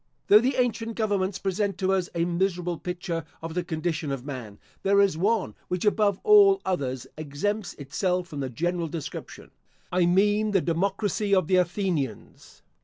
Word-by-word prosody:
Though 210 - +9
the 255 +3 0
ancient 230 -2 -1
governments 200 -3 0
present 195 0 -1
to 190 0 +1
us 185 -2 0
a 170 0 +1
miserable 175 -1 -1
picture 175 -2 -4 0.2
of 165 0 -6
the 180 +1 -1
condition 160 -3 -2
of 135 -2 -4
man, 125 -8 -7 0.2
there 200 +1 +3
is 200 -4 +4
one 205 +5 0
which 180 +2 -2
above 205 -2 +2
all 405 -2 +7
others 135 -9 -2
exempts 175 +8 -3
itself 180 +6 -2
from 145 -4 -6
the 135 -2 -2
general 170 +6 -1
description. 155 -1 -7 0.4
I 180 -1 +3
mean 205 +4 +2
the 195 - +5
democracy 200 +4 0
of 185 -3 +2
the 185 +3 +3
Athenians. 175 - -2
180 Hz, 165 wpm, -26 LUFS, 165-205 Hz, 0.4 s, Though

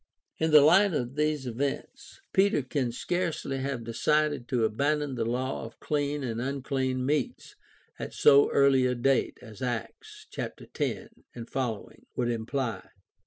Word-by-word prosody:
In 160 - +2
the 150 -1 +8
light 190 +5 +5
of 125 -2 -2
these 150 -1 0
events, 135 - -4
Peter 190 -7 +3
can 130 -2 -1
scarcely 165 0 -2
have 135 -3 -3
decided 145 +3 0
to 120 -3 +1
abandon 145 +5 0
the 115 -2 -2
law 125 +3 -2
of 115 0 -10
clean 145 -1 -1
and 115 -2 -3
unclean 130 -1 -2
meats 145 -1 -2 0.4
at - - -5
so 140 -1 +6
early 135 -2 +4
a 125 - 0
date 130 +2 +1
as 110 -4 -12
Acts, 120 -4 -5
chaps. - - -6
10 - - -2 0.3
f., 120 -2 -3 0.3
would 120 -1 0
imply. 115 -2 -3
135 Hz, 145 wpm, -28 LUFS, 120-145 Hz, 0.4 s, the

